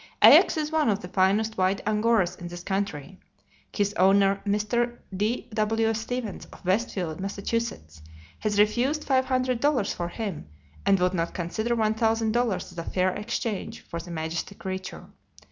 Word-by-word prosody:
Ajax - - +8
is 305 0 -1
one 315 -5 +2
of 205 0 0
the 180 - -7
finest 195 +4 +1
white 185 +2 +2
Angoras 210 -4 +2
in 175 - -8
this 175 0 -8
country. 190 -3 -3 0.5
His 205 -1 0
owner, 195 0 +4
Mr. 235 +4 0 0.2
D.W. 220 +1 0
Stevens, 225 0 -4
of - - -16
West 200 +6 +1
field, 170 -4 -4
Mass., 195 +1 -4 1.0
has 210 -1 0
refused 245 +8 +2
five 260 -1 +2
hundred 255 -2 0
dollars 285 -7 +1
for 175 - -3
him, 190 - -5 0.4
and 195 - +5
would 180 +1 +2
not 170 -2 -2
consider 220 +7 -1
one 215 -1 +2
thousand 225 0 +1
dollars 235 -5 0
as 175 - -8
a - - -3
fair 185 +2 +1
exchange 215 -1 -4
for 170 - -6
the 170 +1 -10
majestic 165 +4 -4
creature. 190 0 -6
205 Hz, 160 wpm, -26 LUFS, 185-230 Hz, 1.0 s, Ajax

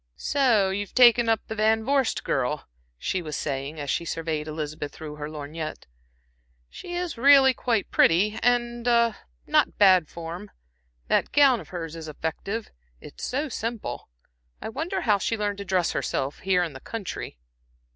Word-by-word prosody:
"So 235 -9 +2
you 195 - -2
have 205 - -16
taken 240 -2 +6
up 225 -2 +2
the - - -5
Van 220 +1 +2
Vorst 275 -1 +1
girl," - - -1 0.3
she 185 - -2
was 155 -3 -5
saying, 140 +2 -4
as 145 -2 -2
she - - -1
surveyed 160 -2 -3
Elizabeth 150 -1 -5
through 150 -1 -9
her 150 0 -5
lorgnette. 155 +1 -6 0.9
"She 350 - -7
is 350 -8 -3
really 270 0 +7
quite 230 -5 -1
pretty, 210 +7 +3
and 240 0 +1
a 235 -1 +3 0.3
not - - +2
bad 185 -6 +5
form. 170 +4 -7 0.6
That - - +1
gown 275 -4 +5
of - - -12
hers 165 -3 -6
is 160 -1 -8
effective 165 +8 -4 0.3
it's - - -11
so 285 +5 -1
simple. 230 - -5 0.5
I - - -5
wonder 325 - -3
how 210 -4 +2
she 225 - -1
learned 205 -1 -2
to 200 - -5
dress 180 -2 +1
herself, 135 +2 -2
here 185 -1 +2
in 165 -4 -4
the 135 - -9
country." 200 - -6
200 Hz, 165 wpm, -25 LUFS, 160-235 Hz, 0.9 s, really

